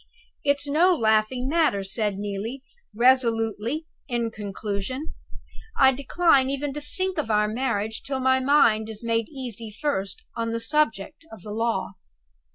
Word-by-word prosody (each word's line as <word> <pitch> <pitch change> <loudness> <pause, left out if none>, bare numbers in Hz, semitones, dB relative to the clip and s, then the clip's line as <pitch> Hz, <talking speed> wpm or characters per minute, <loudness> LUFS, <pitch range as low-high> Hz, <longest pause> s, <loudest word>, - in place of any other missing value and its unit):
"It's 285 0 +1
no 345 +6 +4
laughing 220 +1 +1
matter," 295 -10 +2
said 205 +1 -1
Neelie, 205 +6 -4 0.3
resolutely, 235 +2 +2 0.2
in 235 -3 -1
conclusion; 210 +6 -5 0.6
"I 265 -1 +7
decline 275 +1 +3
even 275 +1 -2
to 295 - -5
think 370 +5 -3
of 225 - -2
our 210 -1 +3
marriage 220 -2 -2
till 270 -1 -3
my 260 0 +3
mind 235 -6 +3
is 220 +1 -5
made 230 -1 0
easy 240 -6 -6
first 210 -5 -3
on 230 -1 -2
the 230 0 -2
subject 285 +1 0
of 215 -5 -12
the 210 - -7
Law." 210 -4 -1
235 Hz, 145 wpm, -25 LUFS, 215-280 Hz, 0.6 s, I